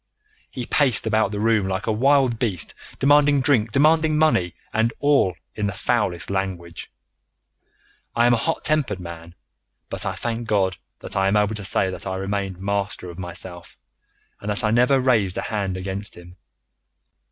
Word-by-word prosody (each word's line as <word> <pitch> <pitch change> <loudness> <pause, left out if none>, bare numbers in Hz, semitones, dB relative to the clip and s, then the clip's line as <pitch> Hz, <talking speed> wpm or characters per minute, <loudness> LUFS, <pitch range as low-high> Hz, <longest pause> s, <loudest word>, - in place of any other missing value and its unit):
He 125 - -6
paced 135 -4 +3
about 110 -2 +2
the 105 0 -4
room 110 -2 +2
like 95 0 -3
a - - 0
wild 130 0 +2
beast, 100 -9 -1 0.2
demanding 145 0 +4
drink, 125 -5 +2
demanding 155 +4 +3
money, 95 - +2 0.2
and 110 +1 +2
all 140 - +2 0.2
in 105 -1 -2
the 100 - -3
foulest 100 -5 -1
language. 90 -3 -4 1.3
I 120 - +3
am 120 - +5
a - - +3
hot 165 +8 -2
tempered 140 -11 0
man, 85 -1 -9 0.6
but - - 0
I - - -2
thank 115 0 -4
God 95 -4 +1 0.2
that - - -7
I 95 0 +2
am 100 +2 +3
able 105 +1 +1
to 105 -2 -5
say 95 0 +2
that 95 - -6
I 95 - -2
remained 95 -1 -3
master 100 -2 -3
of 85 - -12
myself, 90 0 -6 0.6
and 105 - -6
that 105 +3 +1
I 110 - +2
never 125 +4 +4
raised 115 -8 +1
a - - -1
hand 100 -4 -2
against 95 +2 -5
him. 90 0 -13
105 Hz, 175 wpm, -22 LUFS, 95-120 Hz, 1.3 s, am